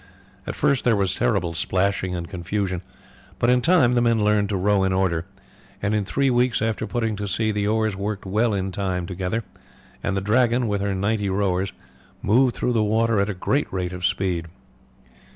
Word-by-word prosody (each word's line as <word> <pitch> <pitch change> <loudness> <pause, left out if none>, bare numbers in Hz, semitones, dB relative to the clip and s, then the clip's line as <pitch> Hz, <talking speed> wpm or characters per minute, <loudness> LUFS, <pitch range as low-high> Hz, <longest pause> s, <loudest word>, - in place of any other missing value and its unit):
At - - -3
first 140 -3 +1
there 120 -3 +3
was 95 -2 +1
terrible 90 -4 0
splashing 95 +1 0
and 85 -1 -4
confusion, 95 0 -3 0.6
but 120 - +3
in 125 0 +3
time 160 -6 +4
the 120 - +3
men 115 -2 +2
learned 105 -1 +2
to 100 - 0
row 100 +1 +2
in 95 0 +1
order, 90 -2 0 0.5
and 100 +1 -1
in 105 -2 0
three 135 +6 +1
weeks 125 -1 +2
after 110 0 -1
putting 115 -3 -1
to 105 0 -4
sea 110 +3 0
the 105 -1 -1
oars 110 -1 +1
worked 100 +1 -4
well 110 +5 +1
in 95 0 -2
time 90 -2 -2
together, 95 +5 -3 0.6
and 100 -1 -1
the - - +2
Dragon, 120 +3 +2
with 100 -2 -1
her 100 -1 -1
ninety 100 +1 0
rowers, 95 -1 0 0.5
moved 125 +4 +3
through 125 - 0
the 110 -2 +2
water 110 +1 +2
at 100 +1 +1
a 100 - -3
great 140 +10 -1
rate 90 -1 -3
of 90 -1 -7
speed. 95 -3 0
100 Hz, 195 wpm, -23 LUFS, 95-115 Hz, 0.6 s, time